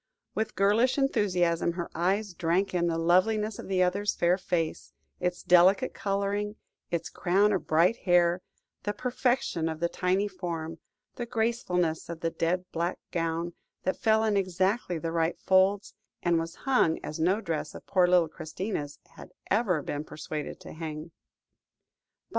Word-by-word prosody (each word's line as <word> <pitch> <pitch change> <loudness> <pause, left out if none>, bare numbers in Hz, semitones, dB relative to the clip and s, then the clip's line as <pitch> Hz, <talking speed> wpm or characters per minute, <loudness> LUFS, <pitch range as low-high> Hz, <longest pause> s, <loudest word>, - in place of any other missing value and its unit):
With 220 0 -2
girlish 215 +7 +3
enthusiasm 180 -10 +1
her 175 -1 -4
eyes 190 +4 0
drank 175 +3 0
in 175 -1 +1
the 165 -1 0
loveliness 200 +6 +2
of - - -7
the 185 -1 +2
other's 200 +3 0
fair 175 +1 +3
face, 175 -4 -2 0.3
its 180 0 -2
delicate 185 +8 +5
colouring, 200 +1 -1 0.3
its 170 -1 -2
crown 200 +4 +2
of 190 - -2
bright 170 +8 +4
hair; 175 -2 +3 0.4
the 205 - -2
perfection 245 - 0
of 160 -1 -5
the 170 - +1
tiny 185 +3 0
form, 165 -4 -5 0.4
the 240 - -4
gracefulness 220 -10 0
of 170 -1 -6
the 165 - 0
dead 180 +3 0
black 170 +2 -1
gown, 165 0 -1 0.3
that 185 - 0
fell 220 -1 +4
in 215 -2 +2
exactly 185 0 0
the 165 +1 -3
right 165 0 0
folds, 190 +2 +3 0.3
and 170 -1 +3
was 165 +1 -5
hung 250 -12 +3
as 155 - -5
no 185 +6 +2
dress 160 -7 -3
of - - -10
poor 180 -2 +3
little 175 -2 +4
Christina's 155 -1 -5
had - - -13 0.2
ever 190 -8 +2
been 145 +1 -3
persuaded 155 -1 -6
to - - -10
hang. 155 0 -6
180 Hz, 155 wpm, -28 LUFS, 165-205 Hz, 0.4 s, delicate